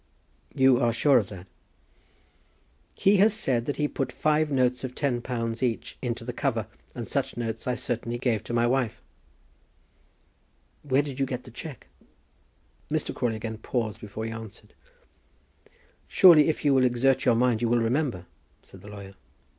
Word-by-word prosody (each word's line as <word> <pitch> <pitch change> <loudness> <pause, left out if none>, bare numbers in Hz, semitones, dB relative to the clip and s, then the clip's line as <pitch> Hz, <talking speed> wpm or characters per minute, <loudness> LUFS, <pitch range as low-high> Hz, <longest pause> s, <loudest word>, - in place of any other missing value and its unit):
"You 130 -2 +5
are 120 -2 +2
sure 130 +3 +4
of 100 - -4
that?" 95 -3 -10 1.5
"He 200 +1 +4
has 210 +2 +4
said 125 - -1
that 145 - -1
he 150 - 0
put 135 -3 -3
five 155 +3 +1
notes 125 -2 +1
of 125 -1 -5
£10 120 -4 -2
each 120 -5 -2
into - - -3
the - - -4
cover, - - -1 0.3
and - - -5
such - - -2
notes 115 0 -4
I 125 - +1
certainly 120 -1 -3
gave 120 -3 0
to - - -5
my 120 0 +3
wife." 120 -3 0 1.8
"Where 140 0 +1
then 145 - -5
did 130 - -9
you 135 - +1
get 125 -1 -4
the 125 - -13
cheque?" 140 +1 -9 1.0
Mr. - - -2
Crawley 120 -2 -1
again 110 0 -6
paused 110 -2 -3
before 110 +1 -6
he 115 - -4
answered. 110 -2 -10 1.3
"Surely, 165 -5 +7
if 155 - -2
you 145 - +5
will 130 -1 +4
exert 125 +2 +2
your 120 - +4
mind, 120 -1 +2
you 120 - +1
will 120 - +3
remember," 120 - 0 0.4
said - - -15
the - - -13
lawyer. 100 -1 -10
125 Hz, 170 wpm, -26 LUFS, 115-135 Hz, 1.8 s, Surely